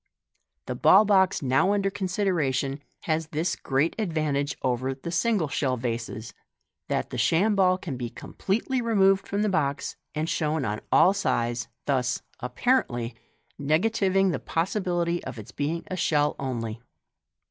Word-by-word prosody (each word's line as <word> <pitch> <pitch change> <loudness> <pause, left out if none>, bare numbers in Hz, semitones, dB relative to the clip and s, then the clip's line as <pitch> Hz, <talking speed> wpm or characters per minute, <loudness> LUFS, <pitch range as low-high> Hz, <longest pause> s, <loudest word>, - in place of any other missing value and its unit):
The - - -3
ball 205 +3 +6
box 190 -5 +3
now 135 +10 +3
under 200 -1 +1
consideration 170 -9 -1 0.2
has 160 -1 -1
this 160 +3 -1
great 140 +5 0
advantage 155 -6 -1
over 130 +1 0
the 140 +5 -6
single 195 -2 +1
shell 130 -2 0
vases, 115 -1 -4 0.5
that - - -2
the 125 - -3
sham 180 - +3
ball 185 -2 +4
can 150 -8 -5
be 120 -1 -4
completely 230 - -2
removed 195 -4 +3
from 200 +1 0
the - - +2
box, 145 -8 -1 0.2
and 155 +1 -1
shown 155 -3 0
on 105 0 -2
all 190 - +6
sides, 120 -11 -1 0.2
thus 130 -3 0 0.2
(apparently) 125 - 0 0.5
negativing 190 +5 +2
the - - -2
possibility 175 -1 -1
of - - -7
its 110 - -9
being 160 +4 -2
a 185 - -5
shell 150 -4 +1
only. 115 -4 -4
160 Hz, 145 wpm, -26 LUFS, 130-195 Hz, 0.5 s, ball